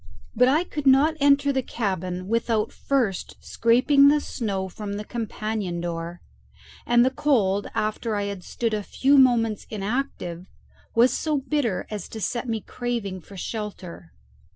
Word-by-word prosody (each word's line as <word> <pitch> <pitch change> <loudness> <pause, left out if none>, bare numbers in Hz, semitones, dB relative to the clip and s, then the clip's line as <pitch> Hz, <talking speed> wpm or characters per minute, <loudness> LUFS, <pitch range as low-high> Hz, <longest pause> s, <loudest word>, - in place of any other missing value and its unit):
But 250 - +5
I 300 +6 +3
could 295 -5 -4
not 280 +4 +5
enter 280 0 +4
the 265 - +1
cabin 185 -6 -3
without 230 0 0
first 240 -9 -1
scraping 265 +5 +4
the 295 +1 +5
snow 200 -9 -3
from 200 +2 -6
the 205 +1 -4
companion 215 -5 -3
door; 170 0 -5 0.7
and 240 0 +5
the 260 - +2
cold, 205 -9 +1
after 215 +1 -1
I 205 - -1
had 200 -2 -5
stood 230 +3 -2
a 210 - 0
few 270 +7 +2
moments 230 -5 +3
inactive, 200 -5 -3 0.5
was 240 +2 +5
so 310 -2 0
bitter 270 -7 -1
as 210 -1 -5
to 220 - -7
set 235 +5 -2
me 225 -1 -1
craving 220 -5 -4
for 195 +3 -13
shelter. 195 - -6
225 Hz, 155 wpm, -24 LUFS, 195-260 Hz, 0.7 s, But